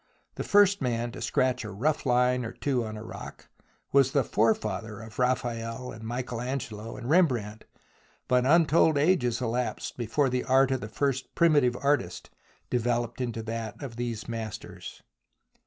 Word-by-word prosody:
The - - -4
first 205 -2 +4
man 120 -2 -1
to - - -9
scratch 130 -1 +1
a 105 - -6
rough 135 +9 -1
line 125 0 +3
or 115 0 -5
two 130 -3 -1
on 110 -1 -6
a 105 - -7
rock - - -10 0.4
was 135 -1 +4
the 140 - +3
forefather 110 -1 0
of 110 0 -10
Raphael 120 -1 -1
and 110 - -10
Michael 120 +1 -4
Angelo 115 -4 -5
and 120 - -7
Rembrandt, 125 - +2 0.6
but 125 -1 +3
untold 160 +1 +4
ages 140 -7 +2
elapsed 120 +2 -2
before 125 +4 +1
the 125 0 0
art 135 0 +4
of 130 -2 0
the 105 - -6
first 135 +3 -2
primitive 145 -8 +4
artist 140 -11 0 0.4
developed 120 0 0
into 115 -2 -3
that 115 -1 -5
of 125 -4 -6
these 120 -2 -4
masters. 115 -3 -7
120 Hz, 155 wpm, -28 LUFS, 115-135 Hz, 0.6 s, first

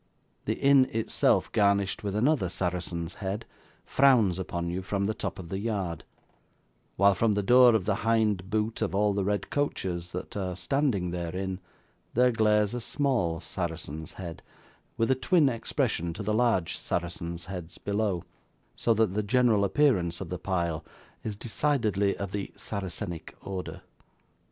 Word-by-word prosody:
The - - 0
inn 135 -2 +5
itself 115 0 +2
garnished 100 -1 +2
with 100 -1 -2
another 125 - +2
Saracen's 85 -1 -2
Head, 100 +3 -3 0.4
frowns 115 -10 +4
upon 85 -2 -3
you 90 +2 -2
from 100 +2 -1
the 110 - 0
top - - -4
of 85 -3 -8
the 95 - -3
yard; 100 -6 -2 0.9
while 100 0 +5
from 105 +2 +2
the 105 - 0
door 125 +2 +7
of 100 -5 0
the - - +1
hind 105 -4 +1
boot 110 +2 -1
of 105 -3 -1
all 105 0 +3
the 100 0 0
red 100 +1 -1
coaches 90 -12 -2
that 90 - -6
are 95 -3 -2
standing 95 - 0
therein, 90 +2 -3 0.6
there 125 +1 +5
glares 105 -2 +3
a 120 - -3
small 115 - 0
Saracen's 80 -2 -5
Head, 85 -3 -7 0.6
with 115 +3 +2
a - - +7
twin 145 +4 +3
expression 85 -7 -1
to 105 - -6
the 105 +1 0
large 110 -7 +2
Saracens' 85 0 -3
Heads 90 -3 -7
below, 100 -4 -1 0.5
so 115 - +2
that 110 -3 +2
the 105 - +1
general 115 -1 +3
appearance 95 - +2
of 95 - -6
the 90 - -4
pile 85 -4 -1 0.4
is 110 -2 -3
decidedly 110 -4 0
of 100 -2 -4
the 100 -1 -4
Saracenic 95 -4 -5
order. 95 -2 -6
100 Hz, 155 wpm, -28 LUFS, 90-110 Hz, 0.9 s, door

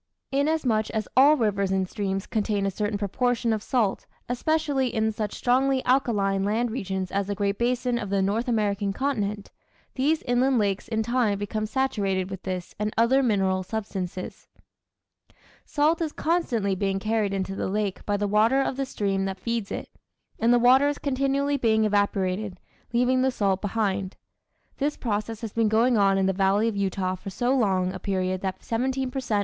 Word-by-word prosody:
Inasmuch 270 -6 +1
as 215 -1 -2
all 285 +4 +6
rivers 200 -5 0
and 190 -1 +1
streams 195 -1 -3
contain 210 -2 -1
a 195 - 0
certain 205 +2 -2
proportion 230 +3 0
of 215 - -2
salt, 220 -4 0 0.2
especially 280 +1 0
in 220 -2 0
such 210 -1 -4
strongly 260 +1 +1
alkaline 205 -7 +2
land 225 +4 0
regions 190 -5 -3
as 200 0 -1
the 205 - -2
Great 200 0 -1
Basin 245 0 0
of 205 - -5
the 200 0 +1
North 215 +6 0
American 205 -3 0
continent, 210 -6 -2 0.4
these 295 +4 +1
inland 250 +1 +2
lakes 200 -2 0
in 220 -1 -1
time 235 -3 +1
become 215 +2 -3
saturated 200 -7 -1
with 190 -1 -6
this 185 -2 -5
and 210 0 -1
other 240 +4 +4
mineral 195 -6 +1
substances. 185 -3 -5 1.2
Salt 315 +3 +1
is 320 -2 -1
constantly 245 - 0
being 195 0 -1
carried 215 0 0
into 195 0 -2
the - - -2
lake 205 -1 -2
by 205 -1 0
the 205 0 -1
water 220 +6 +3
of 270 -1 -1
the 275 -1 -2
stream 195 -4 -1
that 190 0 -4
feeds 230 0 -3
it, - - -4 0.5
and 230 +2 +3
the 245 - +6
water 255 +4 +5
is 290 0 -1
continually 275 +1 0
being 220 -3 +2
evaporated, 200 -2 0 0.3
leaving 250 +2 +2
the 265 - +3
salt 200 -6 0
behind. 200 -2 -1 0.6
This 290 +1 -1
process 220 0 -3
has 225 -3 -5
been 225 -2 +2
going 230 +3 +3
on 195 -2 +3
in 195 - +2
the 190 - +2
valley 195 +3 +2
of 225 - -1
Utah 190 -1 -1
for 185 +1 -7
so 245 +7 0
long 190 -6 +1
a 190 - -6
period 185 -1 -1
that 190 -1 -4
17 255 +2 -1
per 270 - -3
cent. 225 -5 0
215 Hz, 180 wpm, -25 LUFS, 195-250 Hz, 1.2 s, all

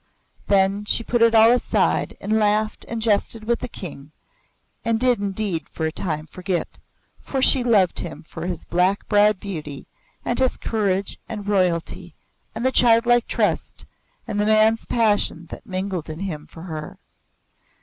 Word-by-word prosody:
Then 200 +1 +2
she 230 - +3
put 240 0 -1
it 230 0 +5
all 225 +1 +7
aside 245 - 0
and 215 +2 0
laughed 215 +1 0
and 230 - -4
jested 220 0 +1
with 235 +1 0
the - - -5
King 150 - -9 0.7
and 230 -1 0
did 250 -2 +3
indeed 195 -4 -2
for 160 - -4
a 160 - -1
time 155 -3 -1
forget, 180 +2 -4 0.4
for 270 - -3
she 260 -1 +6
loved 205 -7 +2
him 170 - -7
for 165 +1 -7
his 175 -3 -5
black 180 +3 0
browed 210 -1 +3
beauty 155 -8 -6 0.4
and 240 - +1
his 260 -1 +1
courage 200 -3 -2
and 210 -3 -6
royalty 180 -5 -1 0.4
and 240 - -3
the 260 - +3
childlike 240 0 +4
trust - - -1 0.4
and 205 -1 -1
the - - +1
man's 220 +1 +3
passion 205 -7 0
that - - -10
mingled 185 -4 -4
in 155 +3 -7
him 155 -7 -5
for 165 - -12
her. 155 -4 -7
205 Hz, 160 wpm, -22 LUFS, 180-225 Hz, 0.7 s, all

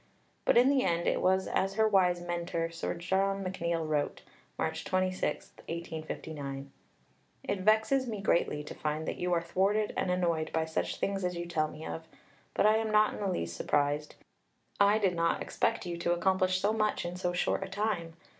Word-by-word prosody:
But - - +4
in 245 +2 +7
the 275 -2 +3
end 170 0 +1
it - - +1
was 190 +1 +2
as 195 +1 0
her 220 0 +4
wise 180 -4 +3
mentor, 170 -1 -2
Sir 165 - -3
John 195 +3 0
McNeill, 170 -3 -2
wrote 150 -2 -1 0.3
(March - - -2
26, 185 0 -1 0.2
1859): 155 -4 -5 0.7
"It 200 - -2
vexes 220 +7 +3
me 215 -3 -3
greatly 170 -6 +1
to - - -8
find 155 +1 -3
that - - -3
you 180 0 -1
are 170 -1 +2
thwarted 200 +5 +1
and - - 0
annoyed 170 -3 0
by 160 0 0
such 160 - -2
things 195 -1 -2
as 180 0 -1
you 170 0 -3
tell 160 -3 0
me 155 +1 -9
of, 160 0 -6 0.5
but - - +3
I 215 +1 +6
am 220 0 -1
not 215 0 +4
in - - -7
the 205 - -1
least 85 - -2
surprised. 145 - 0 0.6
I 205 +1 +5
did 195 -4 +2
not 170 0 +1
expect - - -1
you 175 -1 -3
to 175 0 +1
accomplish 185 +1 +2
so 205 +3 +2
much 215 -4 0
in 175 +1 -4
so 180 -1 -1
short 175 - 0
a 195 - -4
time. 195 -5 -2
180 Hz, 190 wpm, -31 LUFS, 165-195 Hz, 0.7 s, in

